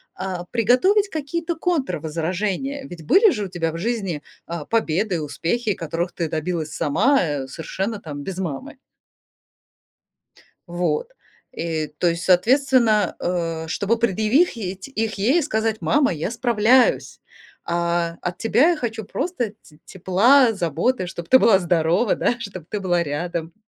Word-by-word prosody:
а, 185 -1 -5
приготовить 255 - +3
какие-то 330 +2 -3
контрвозражения. 210 - -2
Ведь 170 -2 -10
были 400 - +6
же 210 -8 -2
у - - -5
тебя 165 -2 -2
в 165 - -6
жизни, 195 -7 -2 0.2
а, 170 -2 -5
победы 210 -3 0
и - - 0
успехи, 200 +9 -1
которых 170 +1 -3
ты 165 -3 -3
добилась 160 0 -2
сама, 185 - +2
э, 145 -5 -3
совершенно 190 - -4
там 145 -6 -7
без 190 +3 -6
мамы. 190 - -5 1.9
Вот. 175 - -1 0.4
И 160 -2 -3
то 175 - +2
есть, 165 0 -3
соответственно, 225 +1 +3
э, 165 -2 -2
чтобы 205 +7 0
предъявить 215 - 0
их 225 -4 -2
ей, 250 - +2
сказать: 220 -4 -1
"Мама, 290 -6 +2
я 160 +5 -3
справляюсь, 240 +1 +2 0.5
а, 170 0 -1
от 180 0 -4
тебя 245 +8 +3
я - - 0
хочу 225 -5 -4
просто 250 - -3
т 150 -1 -20
тепла, 225 +8 +4
заботы, 180 - 0
чтобы 170 -2 -8
ты 260 - +7
была 210 -6 +5
здорова, 175 +4 +2
да, 240 - +1
чтоб 190 -7 -7
ты 210 - -3
была 175 -3 +1
рядом". 165 +2 -4
190 Hz, 140 wpm, -22 LUFS, 170-240 Hz, 1.9 s, ты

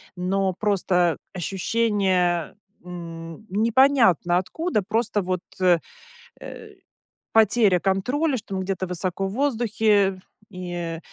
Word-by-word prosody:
но 190 +1 0
просто 180 -4 +1 0.2
ощущение, 190 -2 0 0.3
м, 165 +1 -9
непонятно 220 - +3
откуда, 265 - -1
просто 220 0 0
вот, 185 -1 -2 0.2
э, 180 -2 +4 0.6
э, 435 -2 -10 0.6
потеря 215 -3 +4
контроля, 250 - 0
что 205 -3 -7
он 190 - -2
где-то 185 -1 -3
высоко 180 +2 -3
в - - -5
воздухе, 220 -7 +1 0.3
и, 175 -3 -5
190 Hz, 100 wpm, -23 LUFS, 180-220 Hz, 0.6 s, э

